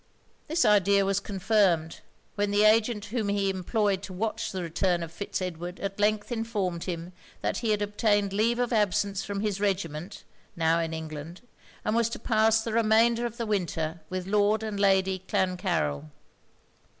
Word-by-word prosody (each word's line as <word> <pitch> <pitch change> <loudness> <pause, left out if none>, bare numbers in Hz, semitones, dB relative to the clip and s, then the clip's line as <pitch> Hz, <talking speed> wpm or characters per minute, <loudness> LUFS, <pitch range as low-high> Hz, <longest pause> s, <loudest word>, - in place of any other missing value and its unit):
This 325 +3 +2
idea 200 -1 +4
was 195 0 +1
confirmed, 190 -5 +1 0.3
when 205 0 0
the 205 +1 +3
agent 215 0 +3
whom 220 -5 0
he 200 -1 +1
employed 195 +1 0
to 195 - -8
watch 215 +4 -2
the 185 -2 -4
return 175 +1 0
of 165 - -7
Fitz 190 +2 -4
Edward 175 0 -5
at 195 0 -4
length 210 +2 +1
informed 210 -7 -2
him 175 0 -5 0.3
that - - -1
he 230 - -2
had 210 -1 +2
obtained 205 -1 +1
leave 225 +4 +2
of 245 0 0
absence 200 -2 +1
from 200 0 -4
his 205 -2 -2
regiment, 185 -2 -2 0.3
now 165 -1 +2
in 165 -1 -2
England, 160 +1 -7 0.4
and 215 - +1
was 230 -1 +2
to - - -5
pass 220 -1 +3
the 225 - -4
remainder 230 +1 +3
of 235 0 -10
the 235 - -2
winter 170 -5 -2
with 185 -1 -4
Lord 210 +2 +2
and 215 -2 -4
Lady 190 -1 +3
Clancarryl. 80 - -1
200 Hz, 170 wpm, -27 LUFS, 180-215 Hz, 0.4 s, idea